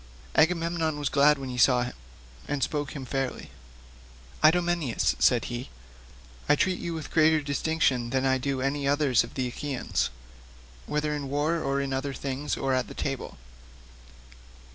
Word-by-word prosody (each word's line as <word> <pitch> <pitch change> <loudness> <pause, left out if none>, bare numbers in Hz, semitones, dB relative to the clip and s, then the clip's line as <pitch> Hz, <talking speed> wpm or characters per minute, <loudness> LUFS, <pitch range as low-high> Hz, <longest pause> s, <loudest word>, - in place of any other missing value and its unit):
Agamemnon 165 -1 +2
was 145 -2 -1
glad 150 +1 +5
when 135 -1 -6
he 125 - -4
saw 125 0 +5
him, 125 - -5 0.5
and 145 -2 -1
spoke 145 0 -2
him 135 -2 -5
fairly. 135 - -3 0.9
"Idomeneus," 170 -5 +2
said 120 -2 +4
he, 120 +1 -5 0.8
"I - - +7
treat 185 +4 +1
you 170 -1 -4
with 160 - -7
greater 160 0 +4
distinction 140 -4 0
than 130 +1 0
I 130 0 +2
do 135 0 -2
any 140 +1 -1
others 140 -3 +3
of - - -11
the 130 -2 -1
Achaeans, 130 +1 -2 0.8
whether 150 0 -1
in 145 -2 -4
war 150 +4 0
or 135 -1 0
in 135 -1 -2
other 135 +1 -2
things, 140 +1 -3
or 135 -1 0
at 130 -1 0
table. 135 -2 -4
140 Hz, 155 wpm, -27 LUFS, 130-155 Hz, 0.9 s, I